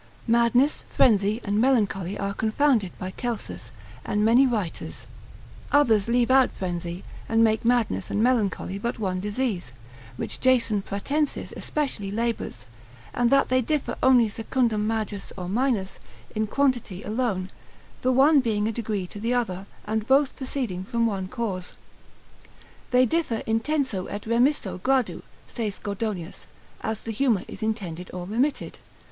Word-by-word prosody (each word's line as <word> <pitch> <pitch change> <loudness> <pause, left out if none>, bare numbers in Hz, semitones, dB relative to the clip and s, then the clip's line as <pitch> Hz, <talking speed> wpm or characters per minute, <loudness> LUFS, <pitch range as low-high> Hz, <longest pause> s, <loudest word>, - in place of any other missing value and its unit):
] - - -26
Madness, 235 +5 +3
frenzy, 210 -2 +3
and 205 +1 +1
melancholy 205 -7 +1
are 200 0 -2
confounded 220 -2 +2
by 185 -1 -5
Celsus, 215 - -5 0.3
and 210 +1 0
many 245 +4 +6
writers; 210 -9 -3 0.7
others 230 -8 +4
leave 240 +1 +2
out 265 -1 +6
frenzy, 175 -1 -4 0.3
and 225 0 +4
make 220 -1 +2
madness 230 - +1
and 210 - +1
melancholy 210 -5 +1
but 235 +3 -2
one 190 -4 -1
disease, 205 - -2 0.5
which - - -3
Jason 235 -5 +3
Pratensis 280 +10 -2
especially 265 -10 -2
labours, 225 - -3 0.5
and 245 -1 +2
that 275 +1 +4
they 255 0 +3
differ 300 +4 -1
only 250 -3 +6
secundam 225 0 0
majus 215 -3 -3
or 180 -2 -5
minus, 215 -2 0 0.3
in 215 0 -1
quantity 240 -7 0
alone, 210 -4 -1 0.5
the 255 - +2
one 280 +4 +6
being 215 -4 0
a - - 0
degree 215 -4 -3
to 205 - -9
the 235 +4 0
other, 195 -5 -2 0.2
and 220 +1 -2
both 275 +1 +3
proceeding 250 -9 -3
from 230 +4 0
one 195 -4 -1
cause. 190 -5 -4 1.1
They 250 0 +5
differ 255 -5 0
intenso 225 -3 0
et 205 - -5
remisso 235 -4 +1
gradu, 260 +3 +1 0.3
saith 215 -5 -4
Gordonius, 200 -4 -4 0.3
as 220 -1 -3
the 225 - -4
humour 225 -3 +1
is - - -9
intended 190 -6 -3
or 180 -1 -5
remitted. 245 +9 -1
225 Hz, 145 wpm, -25 LUFS, 200-250 Hz, 1.1 s, many